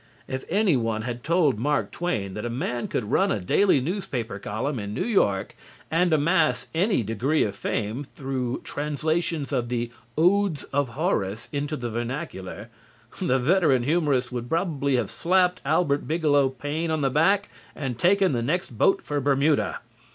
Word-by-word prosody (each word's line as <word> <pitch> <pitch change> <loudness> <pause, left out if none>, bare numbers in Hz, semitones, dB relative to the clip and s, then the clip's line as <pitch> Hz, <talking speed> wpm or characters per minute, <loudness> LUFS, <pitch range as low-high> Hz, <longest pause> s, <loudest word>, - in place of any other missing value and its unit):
If 130 0 -4
any 195 -3 +3
one 115 -3 -1
had 120 0 -5
told 155 -7 +2
Mark 145 +4 0
Twain 110 - -2
that 105 - -5
a 120 - -2
man 120 0 -2
could 110 -2 -3
run 195 +6 +3
a - - 0
daily 145 - +3
newspaper 130 - -3
column 115 +7 -3
in 100 0 -5
New - - -1
York 100 - +1 0.4
and 175 +2 +3
amass 150 -5 +2
any 185 - +2
degree 120 +9 +1
of 100 -1 -2
fame 110 +5 -2
through 130 -3 -4
translations 150 +1 -2
of 125 -4 -1
the 120 -1 -2 0.3
"Odes 180 -1 +3
of 135 -4 0
Horace" 110 - -1
into 145 +1 -2
the 120 -2 -4
vernacular, 115 - -5 0.5
the 150 -8 +2
veteran 140 -2 +3
humorist 140 -4 +1
would 120 -1 -4
probably 150 -5 0
have 120 -5 -1
slapped 180 +1 +2
Albert 145 -1 +1
Bigelow 150 -4 +3
Paine 145 +5 -3
on 160 -1 0
the 135 -1 +1
back 195 +8 +3 0.3
and 130 -5 -4
taken 190 +4 +4
the 120 -3 0
next 150 +1 -2
boat 155 - +3
for 145 -1 -2
Bermuda. 140 +2 +1
140 Hz, 165 wpm, -25 LUFS, 120-165 Hz, 0.5 s, taken